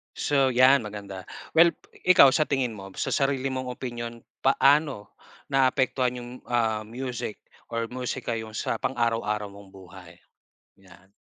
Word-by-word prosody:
So, 135 -2 +2
yan 130 +1 +5
maganda, 100 -3 -8 0.3
well, 170 +1 +7 0.3
ikaw 140 -7 +7
sa 155 - +4
tingin 130 -6 -1
mo, 95 -1 -10
sa - - 0
sarili 135 -1 0
mong 130 -1 -3
opinyon 120 -2 -6 0.2
paano 135 -4 +2 0.3
naapektuhan 130 -2 +1
yung, 120 0 -9 0.2
ah, 110 -2 +1
music 120 -1 -5 0.3
or 115 0 -2
musika 125 -1 -4
yung 110 -1 -6
sa 110 - -2
pang 130 - -2
araw-araw 115 -3 0
mong 100 -1 -14
buhay? 90 -2 -14 0.6
'Yan. 95 -1 -19
120 Hz, 140 wpm, -26 LUFS, 105-130 Hz, 0.6 s, well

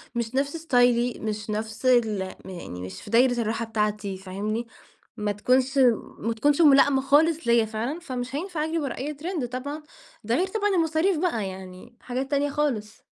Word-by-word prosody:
مش 235 +1 -2
نفس 285 +4 0
ستايلي 245 -5 +2
مش 215 -1 -4
نفس 220 +3 -4
ال 225 -6 +3 0.2
يعني 170 - -7
مش 95 0 -7
في - - -11
دايرة 245 +1 +4
الراحة 225 +1 -1
بتاعتي، 210 -3 -2
فاهمني؟ 210 +5 -4 0.5
ما 210 -1 -1
تكونش 255 +6 +1 0.4
ما 230 +1 -1
تكونش 290 +8 +2
ملائمة 275 -2 +6
خالص 300 +2 +3
ليّا 235 -1 +4
فعلًا، 230 +9 -3
فمش 255 -4 -5
هينفع 330 -1 -2
أجري 325 +1 -1
ورا 275 -4 -3
أي 290 +4 -3
ترند، 305 -3 -3
طبعًا 285 +5 -5 0.4
ده 230 +3 0
غير 370 +6 +1
طبعًا 415 +1 0
المصاريف 330 +2 +2
بقى، 270 - 0
يعني 190 +5 -10
حاجات 260 +3 -4
تانية 285 0 +1
خالص. 260 -8 -2
245 Hz, 170 wpm, -25 LUFS, 215-290 Hz, 0.5 s, ملائمة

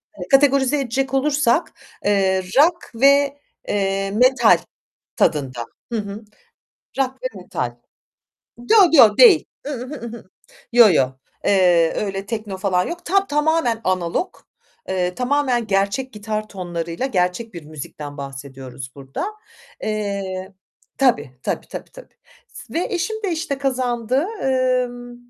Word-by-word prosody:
hani, 180 -2 -7
kategorize 275 +1 +4
edecek 270 +1 -2
olursak, 280 +1 +2 0.3
eee, 195 -2 +2 0.2
rock 340 +4 +3
ve, 280 +3 +4 0.3
eee, 195 -1 -1
metal 255 +5 +5 0.6
tadında. 130 -6 0 0.3
Hı 230 - -1
hı, 205 +1 -6 0.8
rock 265 -1 +1
ve - - -1
metal. - - -4 0.8
Yo, 245 - +2 0.2
yo 230 -9 +7
değil. 410 -10 +8 0.2
I - - -3
ıh, 255 0 -6
I - - -4
ıh, 280 - -9
I - - -7
ıh. 230 - -13 0.5
Yo, 235 -3 +8
yo. 130 -5 +3 0.3
Eee, 175 -4 +4
öyle 195 -1 -3
tekno 215 -3 -4
falan 185 -2 +1
yok. 345 +1 -7
Tam 390 +2 +2
tamamen 295 - +1
analog, 185 - -1 0.5
eee, 180 -1 -1
tamamen 250 -2 0
gerçek 200 +7 0
gitar 215 0 -4
tonlarıyla 175 +2 -4
gerçek 195 0 -1
bir 170 - -7
müzikten 150 -1 -8
bahsediyoruz 135 -2 -8
burada. 135 - -5 0.6
Eee, 200 -3 -3 0.5
tabii 210 - +2
tabii - - -3
tabii - - -8
tabii - - -15 0.3
s - - -12
ve 335 - 0
eşim 440 +5 -2
de 380 - 0
işte 315 -4 -3
kazandı, 255 0 0 0.2
emm, 250 -2 0
225 Hz, 135 wpm, -21 LUFS, 185-270 Hz, 0.8 s, değil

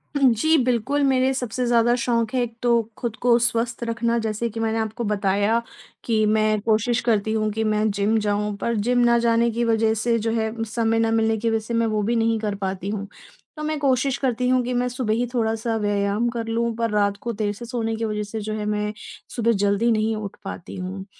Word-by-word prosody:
हुँ। 275 -3 +5
जी, 315 +9 +3
बिल्कुल, 255 +4 +1
मेरे 265 -1 +3
सबसे 250 -1 -2
ज़्यादा 235 0 +4
शौक 230 -2 0
हैं, 255 - +2
एक 235 -1 -3
तो 245 - +1 0.3
खुद 235 -3 -3
को 240 -1 +5
स्वस्थ 230 0 -1
रखना। 230 0 0
जैसे 220 +2 -1
कि 225 +1 -7
मैंने 225 0 0
आपको 220 +2 -3
बताया 205 +1 +1 0.4
कि 220 -2 +1
मैं 215 0 +2
कोशिश 225 +3 +1
करती 220 -2 +2
हूँ 215 -1 0
कि 220 +1 -2
मैं 215 0 +1
जिम 205 +2 +1
जाऊँ, 205 0 0
पर 235 +3 -1
जिम 245 +4 +1
ना 235 - +4
जाने 235 0 +3
की 235 +1 -1
वज़ह 225 -1 +2
से, 230 +2 +1
जो 225 +1 -1
है, 220 -1 0
समय 225 0 0
ना 225 0 +2
मिलने 225 0 +2
की 230 +2 0
वज़ह 225 0 +1
से 235 - -4
मैं 230 0 +2
वो 215 -1 0
भी 235 +4 0
नहीं 225 -1 +1
कर 210 -2 -2
पाती 190 0 -3
हूँ। 200 -1 -4 0.5
तो 305 - -5
मैं 310 0 -1
कोशिश 270 -1 +1
करती 250 -2 0
हूँ 255 0 +3
कि 250 +1 -2
मैं 245 0 +1
सुबह 245 -3 -1
ही 240 +2 0
थोड़ा-सा 225 -1 0
व्यायाम 205 +1 0
कर 235 -1 -4
लूँ, 230 +1 0
पर 230 0 -1
रात 205 -1 +1
को 235 - -3
देर 210 -1 -1
से 235 +4 -9
सोने 225 -2 -2
की 225 +1 -2
वज़ह 210 -1 -2
से, 210 +2 -5
जो 215 +1 -4
है, 215 -1 -3
मैं 210 0 -1 0.4
सुबह 235 -1 +2
जल्दी 205 +4 +2
नहीं 220 0 +1
उठ 210 -2 -6
पाती 195 -3 -7
हूँ 190 +1 -5
225 Hz, 230 wpm, -23 LUFS, 215-235 Hz, 0.5 s, हुँ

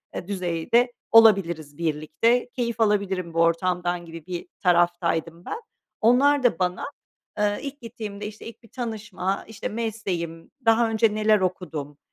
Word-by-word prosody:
eee, 175 - -5
düzeyde 195 +6 +1 0.2
olabiliriz 175 -10 +5
birlikte, 170 +10 +1
keyif 235 -2 -3
alabilirim 195 -5 +1
bu 165 - -1
ortamdan 175 +1 +1
gibi 165 -1 -10
bir 175 -1 -5 0.2
taraftaydım 175 -1 +1
ben. 450 - -5 0.4
Onlar 270 +5 +4
da 235 -10 +3
bana, 180 -1 -1 0.5
eee, 205 0 +1
ilk 285 0 -7
gittiğimde, 215 -4 -7
işte, 210 0 -9
ilk 230 +1 -10
bir 230 - -18
tanışma, 210 -5 -3
işte, 220 - -5
mesleğim, 195 -7 -4
daha 225 0 +4
önce 220 -1 +2
neler 215 -1 +3
okudum, 160 -6 -3
195 Hz, 140 wpm, -25 LUFS, 170-225 Hz, 0.5 s, olabiliriz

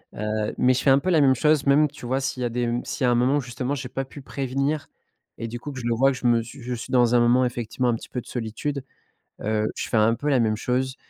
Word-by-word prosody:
heu, 105 0 -2
mais 130 0 +4
je 125 - -1
fais 135 - +5
un 135 - +6
peu 185 - -2
la 160 -5 +4
même 135 -1 +5
chose, 150 +2 +2
même, 145 +2 +5
tu 125 - -11
vois, 130 +3 0
s'il 130 -1 -3
y - - +1
a 120 - 0
des 120 +1 -2
m 120 0 -1
s'il - - -4
y - - +4
a - - +4
un - - +3
moment 125 +4 +3
où, - - 0
justement, 125 +1 -4
j'ai 135 -3 -5
pas 135 - -3
pu 140 +2 -11
prévenir, 140 +3 -2 0.5
et 115 - -3
du 120 +1 -6
coup, 145 +4 -7
que 130 - -7
je 120 - -7
le 120 - +1
vois, 135 +4 +3
je 130 -1 -2
me 115 -1 +3
suis 125 +4 -11
je 125 +1 -4
suis 115 - -8
dans 125 -1 +4
un - - +6
moment, 120 +2 +4
effectivement, 120 +1 -2
un 120 - +2
petit - - -9
peu 125 - -4
de - - -19
solitude, 125 +4 -4 0.6
heu, 110 0 0
je - - -4
fais - - 0
un 110 +1 +4
peu 145 +5 -3
la 135 - +3
même 110 -2 +1
chose, 130 +4 -1
125 Hz, 310 wpm, -24 LUFS, 120-135 Hz, 0.6 s, un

